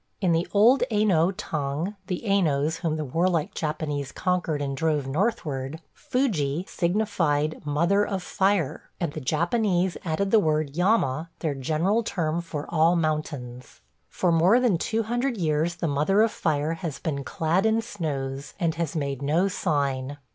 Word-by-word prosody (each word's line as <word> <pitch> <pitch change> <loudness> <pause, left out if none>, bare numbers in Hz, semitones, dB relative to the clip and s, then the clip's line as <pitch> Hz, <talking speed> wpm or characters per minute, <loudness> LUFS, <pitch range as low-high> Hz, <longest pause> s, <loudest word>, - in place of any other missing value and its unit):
In 185 -4 +2
the 165 +1 +1
old 230 +6 +5
Aino 200 -6 +3
tongue 165 -1 -3
– 190 - -36
the 180 +1 -3
Ainos 160 -7 +1
whom 165 -3 -1
the 155 -1 -3
warlike 165 +3 0
Japanese 150 -3 -3
conquered 180 -5 -1
and 140 -1 -2
drove 150 -1 0
northward 150 - -2
– - - -45
"Fuji" 180 - -1
signified 170 -6 0
"Mother 170 +8 +2
of 195 -3 -3
Fire," 190 -7 0
and 170 -5 -2
the 155 - -5
Japanese 175 - +1
added 190 +4 -1
the 225 - +6
word 155 -5 0
"yama," 170 - +1
their 155 -4 0
general 160 - +1
term 170 -6 -1
for 155 -3 -5
all 165 +1 +3
mountains. 150 -6 -3 0.3
For 180 - 0
more 175 +8 +5
than 230 -9 +2
two 225 +4 0
hundred 240 +2 -1
years 160 0 0
the 170 - -2
Mother 155 +9 +3
of 225 - +2
Fire 155 0 0
has 165 -3 -5
been 140 -4 -3
clad 170 +9 +1
in 220 +1 +2
snows 145 - -4
and 165 -3 +1
has 165 -2 -3
made 140 -3 -2
no 160 +7 +2
sign. 145 -7 -1
165 Hz, 160 wpm, -25 LUFS, 145-195 Hz, 0.3 s, the